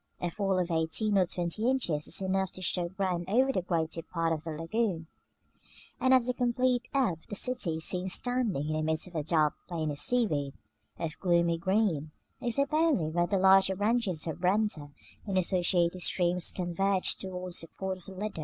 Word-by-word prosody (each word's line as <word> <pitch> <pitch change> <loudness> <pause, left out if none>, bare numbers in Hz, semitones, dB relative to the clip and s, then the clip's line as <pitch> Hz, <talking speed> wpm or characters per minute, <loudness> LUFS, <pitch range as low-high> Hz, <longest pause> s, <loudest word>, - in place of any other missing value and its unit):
A 175 - -2
fall 195 0 0
of 180 -1 0
eighteen 165 +6 0
or 185 -2 +4
twenty 175 +7 -1
inches 175 - 0
is - - -4
enough 190 0 0
to 185 - -7
show 175 0 0
ground 185 -2 -2
over 260 +6 +3
the 185 - 0
greater 165 -2 -1
part 165 0 -1
of 155 -1 -4
the 165 - -5
lagoon; 165 +2 -1 0.9
and 260 - +3
at 255 -2 +5
the 250 - 0
complete 250 0 +1
ebb 245 - +1
the 205 - -4
city 200 -7 0
is 160 - -4
seen 180 0 -1
standing 235 - -1
in - - 0
the 155 - 0
midst 155 0 -1
of 180 - -13
a 160 - -1
dark 155 -1 +2
plain 160 -4 -2
of 145 - -5
seaweed, 155 - 0 0.4
of 155 -2 -4
gloomy 170 -2 +2
green, 185 -5 +1 0.3
except 280 +4 0
only 305 - +2
where 175 +1 +1
the 195 - +1
larger 190 0 +5
branches 205 -5 0
of 160 - -3
the - - -18
Brenta 185 -5 +1 0.4
and 195 -2 0
its 185 - +2
associated 175 0 +2
streams 175 0 +1
converge 185 +2 0
towards 185 -2 -5
the 165 - -8
port 190 +2 -5
of 180 - -11
the 195 - -8
Lido. 195 -1 -4
185 Hz, 200 wpm, -30 LUFS, 165-210 Hz, 0.9 s, at